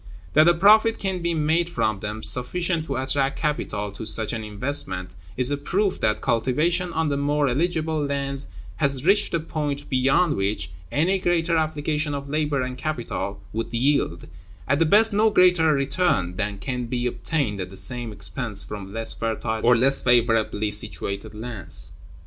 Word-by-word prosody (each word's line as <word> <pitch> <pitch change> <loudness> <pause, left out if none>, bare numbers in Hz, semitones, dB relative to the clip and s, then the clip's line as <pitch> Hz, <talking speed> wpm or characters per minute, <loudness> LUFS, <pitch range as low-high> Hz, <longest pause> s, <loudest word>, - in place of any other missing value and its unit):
That 155 - +6
a 175 - +5
profit 215 +5 +5
can 190 -2 -2
be 170 0 0
made 160 +2 +1
from 110 - -1
them, 105 +2 -5
sufficient 165 +6 +1
to 135 - -2
attract 135 +1 0
capital 105 -9 -2
to 100 - -8
such 110 0 -2
an 110 -2 -4
investment, 105 -4 -3 0.3
is 125 +2 +4
a 145 - 0
proof 190 +7 0
that 110 0 0
cultivation 150 +10 +1
on 160 -2 0
the 140 - 0
more 145 +1 +1
eligible 160 +2 0
lands 140 -1 -3 0.3
has 140 -2 0
reached 205 0 +3
a - - +1
point 145 -3 -3
beyond 135 +6 +3
which 95 -2 -1 0.2
any 180 +6 +1
greater 170 -2 +1
application 155 -1 -1
of 140 0 -6
labor 150 -3 0
and 125 0 -5
capital 120 -9 -4
would 115 +1 -3
yield, 120 - 0 0.4
at 140 +2 +2
the 165 - +3
best, 215 +5 +5
no 215 +2 +4
greater 180 -5 +4
return 140 - +1
than 100 0 -2
can 125 +3 -4
be 120 0 -2
obtained 120 -2 -2
at 90 - -5
the 95 - -8
same 120 0 -2
expense 105 -1 -2
from 100 -1 -7
less 115 +1 -2
fertile 110 0 -2
or 120 +1 +6
less 135 +3 +2
favorably 115 -3 +2
situated 105 -1 -2
lands. 110 -4 -4
140 Hz, 170 wpm, -24 LUFS, 115-160 Hz, 0.4 s, That